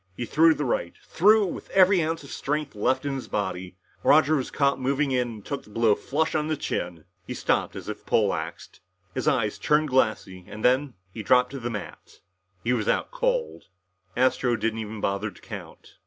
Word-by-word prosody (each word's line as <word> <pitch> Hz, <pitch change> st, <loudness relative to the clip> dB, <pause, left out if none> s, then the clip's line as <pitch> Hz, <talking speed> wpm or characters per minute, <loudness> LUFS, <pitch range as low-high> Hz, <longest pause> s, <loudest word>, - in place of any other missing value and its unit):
He 120 Hz, -, -3 dB
threw 160 Hz, +5 st, +4 dB
the 150 Hz, -, -2 dB
right, 85 Hz, -8 st, -1 dB
threw 210 Hz, +4 st, +4 dB
it -, -, -3 dB
with -, -, -9 dB
every 190 Hz, -1 st, +5 dB
ounce 160 Hz, 0 st, -2 dB
of 140 Hz, -, -11 dB
strength 150 Hz, 0 st, -2 dB
left 110 Hz, +6 st, 0 dB
in 140 Hz, -, -1 dB
his 135 Hz, -2 st, -5 dB
body. 95 Hz, -2 st, -3 dB, 0.2 s
Roger 155 Hz, +1 st, +5 dB
was 135 Hz, -4 st, -2 dB
caught 140 Hz, -2 st, +1 dB
moving 140 Hz, +2 st, +1 dB
in 125 Hz, -1 st, +1 dB
and 110 Hz, -3 st, -9 dB
took 140 Hz, -, -4 dB
the -, -, -18 dB
blow 110 Hz, 0 st, +3 dB
flush 155 Hz, +9 st, -1 dB
on 150 Hz, -1 st, 0 dB
the 155 Hz, -1 st, -1 dB
chin. 85 Hz, -10 st, -4 dB, 0.2 s
He -, -, -4 dB
stopped -, -, 0 dB
as -, -, -8 dB
if -, -, -6 dB
poleaxed. -, -, -1 dB, 0.3 s
His -, -, -3 dB
eyes 105 Hz, -5 st, +1 dB
turned 150 Hz, 0 st, +2 dB
glassy 110 Hz, -7 st, 0 dB
and 105 Hz, +1 st, -6 dB
then 130 Hz, +1 st, +2 dB, 0.2 s
he 110 Hz, -, -5 dB
dropped 125 Hz, +2 st, +3 dB
to 135 Hz, -, -6 dB
the 120 Hz, -1 st, -3 dB
mat. 105 Hz, -4 st, -8 dB, 0.4 s
He 125 Hz, -, +1 dB
was 110 Hz, -4 st, -1 dB
out -, -, 0 dB
cold. -, -, -1 dB, 0.5 s
Astro 125 Hz, -1 st, +2 dB
didn't 115 Hz, 0 st, -2 dB
even 110 Hz, -1 st, -6 dB
bother 100 Hz, +2 st, -1 dB
to 90 Hz, -, -16 dB
count. -, -, -10 dB
130 Hz, 200 wpm, -26 LUFS, 110-150 Hz, 0.5 s, every